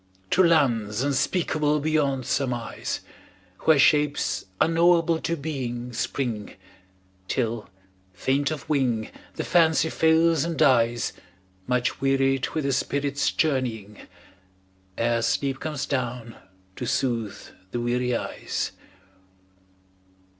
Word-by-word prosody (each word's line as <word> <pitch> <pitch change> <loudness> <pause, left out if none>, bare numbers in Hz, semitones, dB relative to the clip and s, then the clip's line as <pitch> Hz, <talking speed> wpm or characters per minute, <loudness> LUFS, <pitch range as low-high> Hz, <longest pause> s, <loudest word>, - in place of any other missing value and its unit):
To 185 - +5
lands 120 - +2
unspeakable 150 +1 +1
beyond 140 -4 0
surmise, 125 -4 -2 0.6
Where 160 -2 +6
shapes 145 -10 +2
unknowable 165 0 +3
to 170 +1 -2
being 125 -5 -4
spring, 120 -3 -3 0.7
Till, 115 -1 -2 0.4
faint 135 +10 0
of 155 -3 -5
wing, 125 -7 0 0.2
the - - -3
Fancy 160 -2 +3
fails 160 -1 +3
and 165 -1 -3
dies 120 -3 +3 0.5
Much 125 0 0
wearied 135 -1 +2
with 155 - 0
the 140 - +1
spirit's 140 +1 0
journeying, 120 -9 -1 1.0
Ere 115 0 +1
sleep 135 +3 0
comes 150 -3 -3
down 125 -3 -3 0.4
to 125 - -4
soothe 115 -5 -1 0.3
the 120 - -3
weary 125 +1 0
eyes. - - -3
135 Hz, 105 wpm, -25 LUFS, 120-155 Hz, 1.0 s, Where